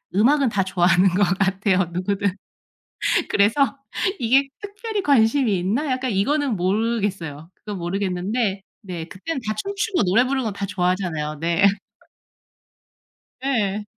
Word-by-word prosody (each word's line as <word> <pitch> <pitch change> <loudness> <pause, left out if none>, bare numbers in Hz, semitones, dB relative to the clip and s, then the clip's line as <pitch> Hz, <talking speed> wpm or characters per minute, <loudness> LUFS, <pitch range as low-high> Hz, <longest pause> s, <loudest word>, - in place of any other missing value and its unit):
음악은 265 +5 +4
다 195 -2 +1
좋아하는 180 0 +3
것 190 +3 +2 0.2
같아요, 190 -1 +2
누구든. 195 +1 -1 0.9
그래서 250 +8 +2 0.4
이게 260 +4 +3
특별히 420 +1 -4
관심이 235 - +3
있나? 235 - -1
약간 255 -1 -1
이거는 270 +6 +1
모르겠어요. 190 -5 -1
그건 210 -2 -7
모르겠는데 195 +3 -1 0.2
네 180 -5 -6
그때는 200 - -5
다 215 - 0
춤추고 395 - -1
노래 205 +7 +4
부르는 265 0 -1
건 210 - -2
다 200 0 -3
좋아하잖아요. 180 -5 -1
네. 170 +3 0 1.8
예. 210 -6 0
200 Hz, 290 characters per minute, -22 LUFS, 185-255 Hz, 1.8 s, 음악은